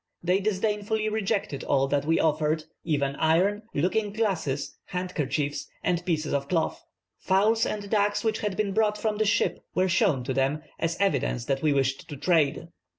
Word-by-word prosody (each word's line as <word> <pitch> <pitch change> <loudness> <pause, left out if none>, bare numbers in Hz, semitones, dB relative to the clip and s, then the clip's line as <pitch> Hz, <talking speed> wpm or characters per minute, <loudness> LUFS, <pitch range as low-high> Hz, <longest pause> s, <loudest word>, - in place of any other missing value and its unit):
They 180 +2 +2
disdainfully 210 +1 0
rejected 205 -8 -1
all 135 -1 +2
that 145 0 +1
we 165 +1 +2
offered, 155 0 +1 0.2
even 140 -4 0
iron, 185 +6 +2
looking 200 +7 +1
glasses, 190 -11 -1
handkerchiefs, 150 -5 -2 0.2
and 175 0 0
pieces 160 -4 -1
of 140 -1 -1
cloth. 165 0 -1 0.4
Fowls 215 +4 +2
and 205 -1 -4
ducks 205 0 +1
which 220 -1 0
had 205 -3 -2
been 205 -2 0
brought 210 -1 +2
from 215 0 -1
the 215 - +3
ship 215 - +1
were 185 +1 +3
shown 170 - +2
to 130 +1 -2
them; 135 +4 0 0.2
as 165 0 -1
evidence 140 -10 +1
that 135 0 -1
we 155 - +3
wished 135 -1 0
to 145 - -6
trade. 160 +1 +1
175 Hz, 170 wpm, -27 LUFS, 145-205 Hz, 0.4 s, the